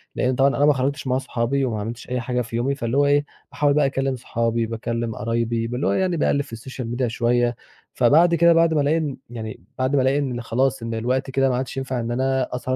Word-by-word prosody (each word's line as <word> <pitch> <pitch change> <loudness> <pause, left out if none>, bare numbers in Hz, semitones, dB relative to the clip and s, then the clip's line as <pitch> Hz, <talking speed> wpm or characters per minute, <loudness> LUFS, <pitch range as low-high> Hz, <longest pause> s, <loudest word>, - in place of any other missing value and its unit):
لإن 125 0 +1
طبعًا 135 +2 +4
أنا 145 - +4
ما 150 - +5
خرجتش 140 +2 -2
مع 130 0 +2
صحابي 135 +1 -1
وما 110 -4 -2
عملتش 115 +4 -6
أي 125 0 -1
حاجة 125 +1 -1
في 115 0 -6
يومي، 130 +4 0
فاللي 120 0 -2
هو 145 - +4
إيه، 145 +1 +3 0.3
باحاول 145 +1 +2
بقى 150 -1 +3
أكلِّم 135 0 -1
صحابي، 115 -1 -1
باكلِّم 115 0 -3
قرايبي، 115 0 -1
باللي 125 +4 -2
هو - - +2
يعني 185 -3 +1
باقلِّب 140 -1 +2
في 130 -5 -8
الsocial 125 +1 -7
media 130 - +1
شوية. 120 +1 +1 0.4
فبعد 160 +8 +4
كده 170 0 +5
بعد 165 -1 +4
ما 150 - +2
ألاقي 150 +3 +2
إن 150 -4 -2
يعني 110 -5 -7
بعد 130 +2 0
ما 135 - +4
ألاقي 135 +2 +2
إن 125 -4 -2
خلاص 120 +1 0
إن 115 0 -4
الوقت 125 +4 -1
كده 135 0 +2
ما 125 - 0
عادش 130 +1 -4
ينفع 130 -2 -2
إن 115 0 -3
أنا 130 0 0
أسهر 130 +1 -2
130 Hz, 240 wpm, -22 LUFS, 115-140 Hz, 0.4 s, ما